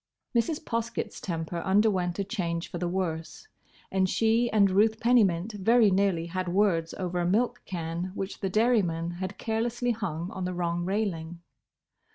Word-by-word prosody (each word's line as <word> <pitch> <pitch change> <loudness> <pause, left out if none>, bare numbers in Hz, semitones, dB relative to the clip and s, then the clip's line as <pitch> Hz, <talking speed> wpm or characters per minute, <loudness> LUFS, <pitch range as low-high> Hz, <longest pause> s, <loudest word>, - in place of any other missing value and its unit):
Mrs. 265 +7 +1
Poskett's 230 -1 -3
temper 165 -1 -3
underwent 190 -1 +2
a 200 - 0
change 175 -5 -3
for 175 - -4
the 175 - -1
worse, 175 - -3 0.4
and 190 -1 +2
she 230 +3 +2
and 200 -3 +4
Ruth 220 +3 +3
Pennymint 215 -5 +3
very 215 +2 +4
nearly 190 -3 +2
had 185 +2 -3
words 175 -4 +1
over 180 -2 -2
a 175 - 0
milk 240 +6 +1
can 170 -1 -3
which 195 0 -4
the 195 - -1
dairy 225 +3 +3
man 165 -1 -2
had 185 +2 -5
carelessly 240 +2 -1
hung 185 -6 -3
on 190 - -5
the 180 0 -2
wrong 175 0 -1
railing. 175 -4 -2
190 Hz, 165 wpm, -28 LUFS, 175-220 Hz, 0.4 s, and